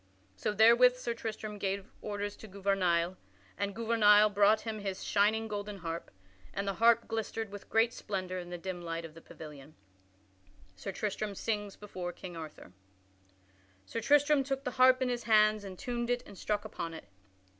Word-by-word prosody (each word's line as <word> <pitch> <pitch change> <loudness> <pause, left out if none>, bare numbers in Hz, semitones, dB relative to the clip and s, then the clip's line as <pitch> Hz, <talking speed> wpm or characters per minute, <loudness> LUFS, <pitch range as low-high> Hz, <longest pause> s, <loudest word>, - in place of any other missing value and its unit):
So 100 - -1
therewith 235 +4 +6
Sir 240 -2 -3
Tristram 215 -2 -5
gave 195 0 -2 0.2
orders 205 0 -4
to 220 - -11
Gouvernail, 185 -3 +1 0.4
and 200 0 -3
Gouvernail 215 -2 +5
brought 210 +2 +4
him 220 -2 -4
his 195 -2 -4
shining 220 +2 +2
golden 205 -1 -5
harp, 165 -2 -5 0.5
and 200 0 -2
the 195 - 0
harp 230 +3 +4
glistered 225 -1 -3
with 205 -1 -10
great 225 +1 +3
splendor 185 -2 -4
in 175 -1 -8
the 175 - -5
dim 180 0 -5
light 165 -1 -4
of 160 - -10
the 165 - -13
pavilion. 150 -2 -12 0.2
[Sidenote: 95 0 -30
Sir 195 - -4
Tristram 210 0 -3
sings 205 -1 -2
before 185 -4 -6
King 180 -1 -9
Arthur] 155 - -9 1.1
Sir 230 - -4
Tristram 290 +2 +4
took 270 0 -3
the 250 - -2
harp 255 +1 +5
in 255 - 0
his 240 -1 -3
hands 215 -1 +4
and 190 -2 -8
tuned 240 -1 -3
it 245 0 0
and 205 - -12
struck 210 +2 -2
upon 170 -5 -5
it. 130 - -11
205 Hz, 175 wpm, -32 LUFS, 180-225 Hz, 1.1 s, therewith